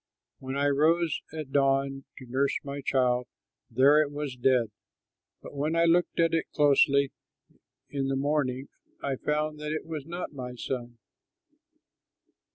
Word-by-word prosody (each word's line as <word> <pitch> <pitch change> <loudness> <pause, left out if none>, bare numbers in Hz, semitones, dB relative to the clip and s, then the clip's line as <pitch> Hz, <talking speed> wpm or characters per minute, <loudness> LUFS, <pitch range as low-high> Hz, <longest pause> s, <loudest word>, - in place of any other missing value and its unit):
When 130 +1 -5
I 140 - +1
rose 160 +3 +2
at 155 -3 -6
dawn 135 0 +1
to 130 - -10
nurse 135 +3 0
my 140 0 -5
child, 125 -2 +1 0.4
there 140 +6 +5
it 150 - 0
was 145 -3 -4
dead; 125 -3 +2 0.7
but - - -10
when 150 +3 -1
I 165 0 +4
looked 170 +1 +2
at 165 -1 +3
it 165 - 0
closely 140 -1 +4 0.8
in 135 -1 -2
the 135 - 0
morning, 135 -2 -1 0.3
I 140 -1 -1
found 150 +1 -1
that 150 0 -4
it 155 - -4
was 155 -3 -6
not 175 -1 -5
my 125 -2 -6
son." 120 -1 -5
140 Hz, 150 wpm, -28 LUFS, 130-150 Hz, 0.8 s, there